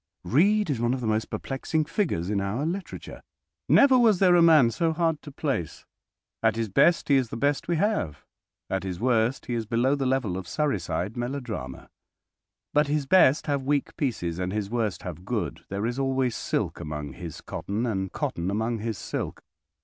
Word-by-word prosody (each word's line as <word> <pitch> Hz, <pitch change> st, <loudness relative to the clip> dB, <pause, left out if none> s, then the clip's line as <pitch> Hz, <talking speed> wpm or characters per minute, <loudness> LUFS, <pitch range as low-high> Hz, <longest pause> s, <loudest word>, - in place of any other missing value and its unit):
Reade 185 Hz, -, +3 dB
is 130 Hz, -, -1 dB
one 120 Hz, +2 st, +2 dB
of -, -, -5 dB
the -, -, -3 dB
most 110 Hz, 0 st, 0 dB
perplexing 150 Hz, +3 st, -2 dB
figures 145 Hz, -, -1 dB
in 100 Hz, -2 st, 0 dB
our 105 Hz, +9 st, -2 dB
literature. 185 Hz, +4 st, -5 dB, 0.5 s
Never 270 Hz, -2 st, +6 dB
was 225 Hz, -5 st, +5 dB
there 180 Hz, -1 st, +5 dB
a 175 Hz, -, +6 dB
man 155 Hz, -8 st, +6 dB
so 160 Hz, +8 st, 0 dB
hard 160 Hz, -2 st, 0 dB
to 145 Hz, -, -10 dB
place. 135 Hz, -, -3 dB, 0.6 s
At -, -, +3 dB
his 115 Hz, -1 st, -2 dB
best 170 Hz, -, +3 dB
he 140 Hz, -, +6 dB
is 130 Hz, -4 st, 0 dB
the 115 Hz, -, -5 dB
best 140 Hz, +3 st, 0 dB
we 170 Hz, -, +1 dB
have. 165 Hz, -, -1 dB, 0.4 s
At 95 Hz, -, -1 dB
his 95 Hz, -2 st, -5 dB
worst 120 Hz, +1 st, +1 dB
he 120 Hz, -, -3 dB
is 115 Hz, -2 st, -2 dB
below 120 Hz, +4 st, +2 dB
the 140 Hz, -2 st, 0 dB
level 130 Hz, -9 st, 0 dB
of 95 Hz, -2 st, -6 dB
Surreyside 105 Hz, -, -1 dB
melodrama. 120 Hz, -, -5 dB, 0.9 s
But 150 Hz, 0 st, +3 dB
his 145 Hz, -1 st, 0 dB
best 150 Hz, -2 st, +5 dB
have 145 Hz, -2 st, 0 dB
weak 140 Hz, +1 st, -1 dB
pieces, 90 Hz, -, -2 dB
and 90 Hz, 0 st, -2 dB
his 105 Hz, 0 st, -3 dB
worst 110 Hz, -6 st, -1 dB
have -, -, -7 dB
good. -, -, -3 dB
There 100 Hz, +2 st, -2 dB
is 120 Hz, +3 st, -2 dB
always 130 Hz, -3 st, 0 dB
silk -, -, -2 dB
among 75 Hz, -4 st, -5 dB
his 85 Hz, 0 st, -8 dB
cotton, 105 Hz, +5 st, -3 dB
and 95 Hz, -5 st, -2 dB
cotton 85 Hz, +2 st, -2 dB
among 110 Hz, +3 st, -1 dB
his 110 Hz, -1 st, -3 dB
silk. -, -, -5 dB
120 Hz, 190 wpm, -26 LUFS, 100-150 Hz, 0.9 s, Never